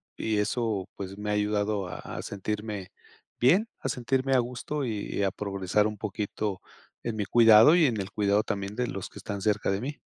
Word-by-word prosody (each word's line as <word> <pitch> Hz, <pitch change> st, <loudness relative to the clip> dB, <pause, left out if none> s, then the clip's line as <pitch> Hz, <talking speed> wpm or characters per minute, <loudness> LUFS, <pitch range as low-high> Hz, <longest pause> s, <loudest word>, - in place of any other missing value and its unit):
y 110 Hz, -1 st, -1 dB
eso, 105 Hz, -2 st, -1 dB
pues, 100 Hz, 0 st, -7 dB
me 105 Hz, 0 st, -4 dB
ha -, -, +1 dB
ayudado 105 Hz, -1 st, 0 dB
a 90 Hz, -, -6 dB
a -, -, -6 dB
sentirme 105 Hz, -1 st, -4 dB, 0.5 s
bien. 180 Hz, -, +4 dB
A 135 Hz, -, -3 dB
sentirme 130 Hz, +2 st, 0 dB
a -, -, +5 dB
gusto 125 Hz, +4 st, -3 dB
y 105 Hz, -3 st, -2 dB
a 95 Hz, -, +2 dB
progresar 100 Hz, +1 st, 0 dB
un 105 Hz, -1 st, -5 dB
poquito 105 Hz, -1 st, -3 dB, 0.4 s
en 115 Hz, -2 st, -2 dB
mi 105 Hz, -2 st, -1 dB
cuidado 115 Hz, +5 st, +7 dB
y 175 Hz, -3 st, +5 dB
en 115 Hz, -4 st, -1 dB
el 95 Hz, 0 st, -4 dB
cuidado 105 Hz, 0 st, +2 dB
también 100 Hz, -1 st, -3 dB
de 125 Hz, +1 st, 0 dB
los 95 Hz, -3 st, -5 dB
que -, -, -14 dB
están 100 Hz, -2 st, -5 dB
cerca 105 Hz, -1 st, +1 dB
de 95 Hz, +1 st, -1 dB
mí. 145 Hz, +4 st, -5 dB
105 Hz, 200 wpm, -28 LUFS, 100-120 Hz, 0.5 s, cuidado